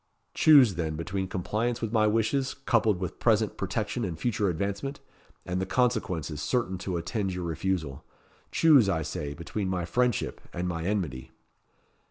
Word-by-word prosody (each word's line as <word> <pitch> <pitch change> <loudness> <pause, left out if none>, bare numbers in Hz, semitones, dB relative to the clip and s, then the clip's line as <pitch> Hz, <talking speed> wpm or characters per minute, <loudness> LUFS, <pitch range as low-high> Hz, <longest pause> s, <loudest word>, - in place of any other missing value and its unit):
Choose, 140 -9 +7
then, 80 -3 -2
between 95 +4 -3
compliance 110 +6 -2
with 115 -2 -3
my 110 -2 +4
wishes, 115 +5 +1
coupled 110 -5 +3
with 90 -2 -5
present 110 -2 +2
protection 110 +4 -2
and 90 -6 -3
future 105 0 0
advancement, 100 - -3 0.5
and 90 +1 -2
the - - 0
consequences 95 - 0
certain 95 - -1
to 90 -1 -3
attend 95 +2 -2
your 90 - -4
refusal. 85 -4 -2 0.5
Choose, 145 -11 +5
I 80 -4 0
say, 75 -1 -4
between 95 +5 -4
my 90 -2 -1
friendship 125 +3 0
and 90 +1 -2
my 85 -2 -3
enmity." 80 -11 -2
95 Hz, 155 wpm, -28 LUFS, 85-115 Hz, 0.5 s, Choose